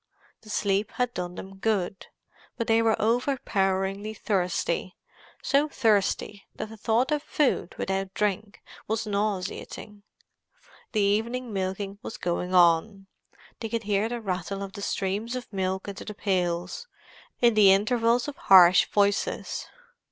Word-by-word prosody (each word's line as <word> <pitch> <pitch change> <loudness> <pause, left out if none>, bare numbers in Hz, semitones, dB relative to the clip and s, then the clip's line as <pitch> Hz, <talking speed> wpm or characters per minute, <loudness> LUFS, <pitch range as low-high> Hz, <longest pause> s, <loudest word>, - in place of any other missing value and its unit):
The 215 - -15
sleep 205 0 0
had 245 -1 -1
done 180 0 -4
them 195 +1 -9
good, 195 -3 -1 0.5
but 230 - -1
they 225 0 +3
were 225 -1 +2
overpoweringly 210 -4 0
thirsty—so 195 - -2
thirsty 210 -4 0
that 215 - -5
the 220 - -10
thought 230 +6 +1
of 300 -1 +1
food 300 - 0
without 195 0 -2
drink 210 0 -2 0.2
was 220 +1 -1
nauseating. 205 0 -3 0.9
The 215 - +2
evening 225 +4 0
milking 195 +1 -3
was 225 - -7
going 180 +1 -2
on; 180 +3 +4 0.5
they 225 - -4
could 230 +1 -2
hear 205 +1 0
the 240 -1 -4
rattle 195 0 -3
of 195 -1 -8
the 200 - -8
streams 200 +5 -2
of 245 -4 -7
milk 190 0 -2
into 200 -1 -6
the 210 - -7
pails, 180 - -2 0.5
in 240 -1 +5
the 205 -3 +7
intervals 230 +4 +2
of 290 - -5
harsh 185 -1 +7
voices. 205 -1 0
205 Hz, 135 wpm, -26 LUFS, 190-225 Hz, 0.9 s, the